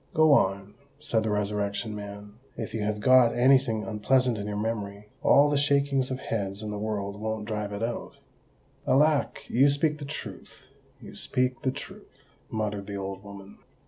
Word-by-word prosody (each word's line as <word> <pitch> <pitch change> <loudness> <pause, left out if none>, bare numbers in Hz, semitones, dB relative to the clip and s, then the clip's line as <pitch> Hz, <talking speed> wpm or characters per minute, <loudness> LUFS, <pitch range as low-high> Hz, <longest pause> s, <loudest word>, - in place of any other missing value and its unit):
"Go 155 0 +5
on," 100 -5 +2 0.3
said 120 -7 0
the 110 - -1
Resurrection 105 +1 -2
Man. 100 0 -8 0.2
"If 110 - -5
you 110 - -2
have 105 0 -1
got 125 +1 +5
any 130 +2 +6
thing 115 -5 -3
unpleasant 125 +3 +1
in 105 -1 -5
your 105 -1 -3
memory, 105 -2 -4
all 145 +1 +6
the 145 -1 +1
shakings 140 -2 +2
of 130 -1 -3
heads 100 -4 -3
in 105 - -4
the 105 - -4
world 105 -1 -3
won't 110 -1 -3
drive 105 -2 -3
it 100 +2 -4
out." 115 +1 -4 0.7
"Alack! 145 +2 +2
you 135 +4 +4
speak 150 +2 +1
the 145 - -6
truth—you 140 - -10
speak 125 -1 -1
the 130 - 0
truth," 130 - -9 0.2
muttered 105 -2 -3
the 100 - -5
old 95 0 -5
woman. 100 -1 -12
110 Hz, 175 wpm, -27 LUFS, 105-130 Hz, 0.7 s, any